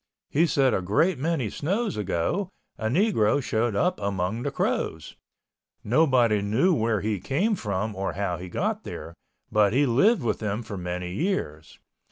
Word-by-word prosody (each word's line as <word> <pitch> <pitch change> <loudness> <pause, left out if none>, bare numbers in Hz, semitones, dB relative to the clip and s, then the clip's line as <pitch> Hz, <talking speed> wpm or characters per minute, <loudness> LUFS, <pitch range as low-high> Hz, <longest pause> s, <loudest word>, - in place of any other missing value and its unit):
He 165 +4 +3
said 135 -3 +2
a - - +1
great 130 - +1
many 140 - -1
snows 200 +8 -1
ago, 105 - -1 0.3
a 110 - -3
Negro 145 - +2
showed 115 -4 -1
up 180 - +1
among 100 +2 -2
the 145 - -1
Crows. 80 - -2 0.7
Nobody 120 -4 +3
knew 115 - +2
where 110 - +1
he 105 -1 -1
came 160 - 0
from 105 - -2
or 95 0 -2
how 95 -3 -2
he 90 +1 -8
got - - -2
there, 85 - -7 0.4
but 105 -1 +3
he 140 +3 +4
lived 155 - +3
with 110 -2 0
them 105 +1 -2
for 110 -2 -7
many 90 -1 -4
years. 95 - -3
110 Hz, 165 wpm, -26 LUFS, 100-150 Hz, 0.7 s, he